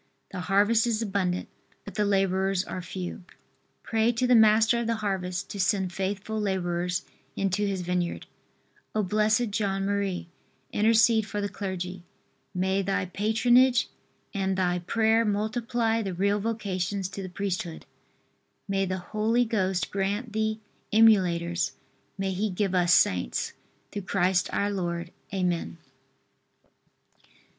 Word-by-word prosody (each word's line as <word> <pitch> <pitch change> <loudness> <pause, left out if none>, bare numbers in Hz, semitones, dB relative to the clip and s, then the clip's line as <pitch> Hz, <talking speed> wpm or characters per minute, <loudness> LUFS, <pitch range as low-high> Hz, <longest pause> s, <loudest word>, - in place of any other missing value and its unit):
The 185 - -5
harvest 205 +5 +3
is 230 -1 0
abundant, 190 -3 -1 0.4
but 200 - -8
the 210 - +1
laborers 195 -1 +1
are 185 -2 -5
few. 180 0 -6 0.6
Pray 225 +1 +2
to 245 +2 0
the 250 - +4
Master 220 +1 +5
of 235 - -2
the 230 - +1
harvest 185 -4 -3
to 200 - -6
send 190 -1 +1
faithful 205 +3 -3
laborers 180 -2 -1 0.3
into 195 +1 0
His 195 -2 -2
vineyard. 180 -1 -2 0.7
O, 215 - +2
Bl. 210 +3 0 0.3
John 195 -2 -1
Marie! 200 -3 -1 0.4
Intercede 220 0 +4
for 205 - -3
the 205 - -1
clergy. 185 -2 -5 0.5
May 190 +2 0
thy 195 -1 0
patronage, 240 +6 +3 0.4
and 190 -2 -1
thy 180 -1 +1
prayer 220 +5 +2
multiply 225 +2 0
the 195 -4 -3
real 200 +3 +1
vocations 200 -3 -2
to 195 0 -6
the 185 - -6
priesthood. 180 -3 -4 0.8
May 195 -1 0
the 185 0 -2
Holy 220 +6 +1
Ghost 190 -5 0
grant 205 +4 -2
thee 220 0 0 0.3
emulators; 180 -6 +3 0.4
may 195 -1 -1
He 200 +3 -1
give 195 0 -1
us 175 -1 +3
Saints! 90 - +2 0.4
Through 205 - -4
Christ, 185 -1 +1
our 205 +1 0
Lord. 175 -3 -3 0.2
Amen. 180 -3 -1
195 Hz, 135 wpm, -27 LUFS, 185-215 Hz, 0.8 s, Master